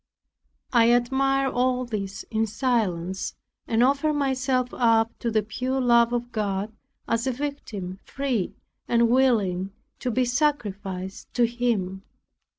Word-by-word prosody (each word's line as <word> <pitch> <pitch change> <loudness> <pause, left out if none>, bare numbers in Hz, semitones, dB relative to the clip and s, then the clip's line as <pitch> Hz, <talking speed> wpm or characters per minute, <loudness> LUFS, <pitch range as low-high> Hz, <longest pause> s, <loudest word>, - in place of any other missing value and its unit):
I 235 -2 +6
admired 265 +3 +2
all 250 0 +1
this 200 -4 -4
in 220 0 +1
silence, 195 -7 -1 0.3
and 230 +1 +3
offered 280 +4 +2
myself 260 -2 0
up 225 -1 +3
to 235 - -1
the 215 -1 +1
pure 255 +5 -2
love 235 -2 +4
of 240 0 -2
God, 205 -1 -2 0.3
as 230 +3 0
a - - +2
victim, 235 -9 -5
free 260 -8 -2 0.3
and 235 -1 +3
willing 200 -8 +2 0.3
to 255 - -2
be 250 +2 +1
sacrificed 205 -9 -2
to 240 - +4
Him. 225 -6 -1
235 Hz, 130 wpm, -25 LUFS, 210-255 Hz, 0.3 s, I